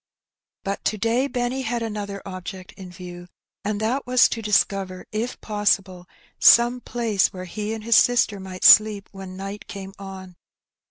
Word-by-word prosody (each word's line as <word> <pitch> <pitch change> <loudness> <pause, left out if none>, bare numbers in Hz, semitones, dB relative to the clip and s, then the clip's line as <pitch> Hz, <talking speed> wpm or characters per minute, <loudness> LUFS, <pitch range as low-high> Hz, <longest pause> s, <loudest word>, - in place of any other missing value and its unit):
But 195 0 -4
to 215 - 0
day 230 +6 +1
Benny 250 0 -2
had 235 -1 -2
another 205 -3 -5
object 185 0 -8
in 190 -2 -11
view, 175 0 -10 0.4
and 205 0 -2
that 245 +5 -1
was 250 -1 +5
to 230 - -4
discover, 195 -3 0
if 225 +4 -3
possible, 195 -4 -1 0.3
some 240 +1 +6
place 225 -6 0
where 185 -1 -8
he 210 +3 -5
and 220 - -8
his 230 0 +4
sister 235 -4 +3
might 185 -1 -8
sleep 210 -2 +6
when 190 -1 -9
night 195 +2 -7
came 195 -1 -8
on. 190 -2 -10
205 Hz, 160 wpm, -23 LUFS, 190-230 Hz, 0.4 s, some